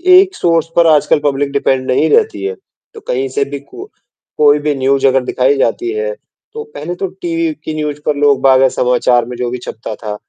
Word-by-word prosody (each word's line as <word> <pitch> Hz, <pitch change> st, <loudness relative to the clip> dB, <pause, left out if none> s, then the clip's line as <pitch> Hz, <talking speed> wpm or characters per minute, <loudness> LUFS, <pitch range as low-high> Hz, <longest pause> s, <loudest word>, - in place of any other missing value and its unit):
एक 380 Hz, 0 st, +5 dB
सोर्स 165 Hz, -2 st, +1 dB
पर 170 Hz, -1 st, +4 dB
आजकल 150 Hz, 0 st, +2 dB
पब्लिक 140 Hz, 0 st, 0 dB
डिपेंड 135 Hz, -2 st, 0 dB
नहीं 155 Hz, +5 st, +2 dB
रहती 445 Hz, -3 st, +1 dB
है। 430 Hz, +3 st, -3 dB, 0.4 s
तो 440 Hz, -, -10 dB
कहीं 410 Hz, -5 st, -1 dB
से 425 Hz, -, +2 dB
भी -, -, -4 dB
कु 390 Hz, +1 st, -12 dB, 0.5 s
कोई 150 Hz, 0 st, +4 dB
भी 150 Hz, 0 st, -1 dB
न्यूज़ 135 Hz, +1 st, +2 dB
अगर 130 Hz, -1 st, +2 dB
दिखाई 130 Hz, +3 st, +1 dB
जाती 360 Hz, -, 0 dB
है, 450 Hz, +4 st, -2 dB, 0.4 s
तो 450 Hz, 0 st, -6 dB
पहले 175 Hz, -, -5 dB
तो 190 Hz, +2 st, -3 dB
टीवी 165 Hz, -2 st, -1 dB
की 155 Hz, -, -3 dB
न्यूज़ 150 Hz, -1 st, -3 dB
पर 150 Hz, -, +1 dB
लोग 140 Hz, -1 st, +3 dB
बागा 130 Hz, 0 st, +5 dB
समाचार 125 Hz, -1 st, +2 dB
में 125 Hz, 0 st, -7 dB
जो 125 Hz, -1 st, -2 dB
भी 125 Hz, -, -4 dB
छपता 110 Hz, -1 st, -7 dB
था, 105 Hz, -2 st, -6 dB
150 Hz, 210 wpm, -14 LUFS, 130-190 Hz, 0.5 s, एक